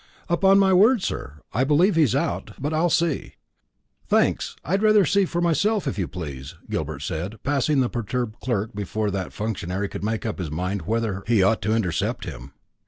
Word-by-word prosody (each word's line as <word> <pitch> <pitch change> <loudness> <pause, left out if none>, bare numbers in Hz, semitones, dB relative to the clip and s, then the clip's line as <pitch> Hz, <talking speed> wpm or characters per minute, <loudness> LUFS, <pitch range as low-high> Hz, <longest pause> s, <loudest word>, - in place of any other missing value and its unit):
"Upon 190 +3 +4
my 195 -1 +4
word, 215 +4 +5
sir, 75 +2 -4
I 120 +6 +2
believe 155 +8 +4
he's 155 -8 +3
out; - - -2
but 145 +3 -2
I'll 165 +3 +2
see." 165 -2 0 0.7
"Thanks; - - +1
I'd 195 +7 0
rather 215 -2 +5
see 195 +4 +2
myself, 175 +5 +1
if 130 - -2
you 90 - -1
please," 70 -7 -7 0.2
Gilbert - - -3
said, 90 +7 -4
passing 140 0 +2
the 125 - +2
perturbed 120 0 -3
clerk 115 -2 -2
before 105 +1 -2
that 95 -2 -3
functionary 100 -2 -3
could - - -7
make 110 +1 -2
up 110 -3 -3
his 85 -4 -3
mind 90 +5 -3
whether 110 -3 -1
he 110 -5 +4
ought 110 +3 +2
to 110 - +1
intercept 90 -8 -1
him. 70 +3 -8
115 Hz, 180 wpm, -24 LUFS, -, 0.7 s, word